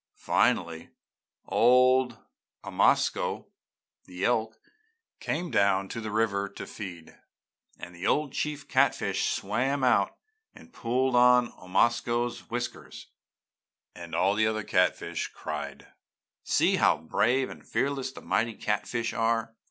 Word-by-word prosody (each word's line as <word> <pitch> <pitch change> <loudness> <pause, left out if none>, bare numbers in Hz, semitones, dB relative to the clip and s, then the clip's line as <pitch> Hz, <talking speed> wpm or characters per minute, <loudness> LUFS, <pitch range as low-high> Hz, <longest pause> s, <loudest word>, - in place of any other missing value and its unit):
"Finally 80 -1 0 0.6
old 125 0 +4 0.5
Omasko, - - +1 0.6
the 90 +1 -4
elk, 110 -2 0 0.6
came 175 -1 -3
down 100 -1 +2
to 115 - -5
the 110 - -5
river 105 -2 0
to - - -8
feed, 90 -5 -9 0.6
and 90 - -10
the 85 +2 -4
old 150 -2 +1
chief 150 -2 -3
catfish - - +1
swam 130 +7 -1
out 115 -6 +2 0.4
and 245 - -16
pulled 125 +2 0
on 125 0 +5
Omasko's 120 +5 0
whiskers, 120 0 -6 0.8
and 85 -1 -8
all 95 +4 +2
the 110 +1 +2
other 110 -1 -2
catfish 90 -2 0
cried: 75 -2 -7 0.6
'See - - +2
how - - +4
brave 120 - 0
and - - -12
fearless 135 -1 -1
the - - -11
mighty 115 0 0
catfish 115 +3 -2
are!' 115 -1 0
115 Hz, 120 wpm, -28 LUFS, 100-125 Hz, 0.8 s, on